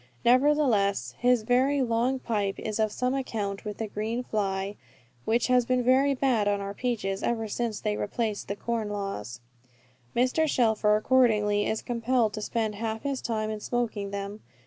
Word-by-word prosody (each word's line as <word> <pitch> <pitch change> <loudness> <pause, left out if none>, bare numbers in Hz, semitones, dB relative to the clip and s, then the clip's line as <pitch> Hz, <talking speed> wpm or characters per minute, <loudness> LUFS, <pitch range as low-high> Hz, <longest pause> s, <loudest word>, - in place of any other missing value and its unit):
Nevertheless, 240 - +3
his 245 -2 +3
very 260 +4 +2
long 240 +2 +1
pipe 205 -6 -2
is 215 0 -4
of 215 -1 +2
some 250 +4 -1
account 210 -7 -3
with 210 -2 -5
the 225 - -2
green 220 +4 -3
fly, 195 -2 -2 0.5
which 230 +2 +2
has 250 -1 +4
been 250 +1 +1
very 270 +3 +4
bad 250 -6 +1
on 205 0 +1
our 200 0 -4
peaches, 205 -5 -2
ever 225 -2 -1
since 220 0 -2
they 210 -1 -1
repealed 215 0 -2
the 200 - -3
corn 225 0 -2
laws. 195 - -5 0.7
Mr. 255 +6 +2
Shelfer, 220 -4 +3
accordingly, 215 -4 +3
is 220 - -2
compelled 235 -2 +1
to 215 - -4
spend 220 0 -1
half 220 +1 -4
his 280 -2 -2
time 215 -2 -2
in 215 - -4
smoking 220 -3 -2
them. 200 +1 -5
220 Hz, 170 wpm, -27 LUFS, 205-250 Hz, 0.7 s, has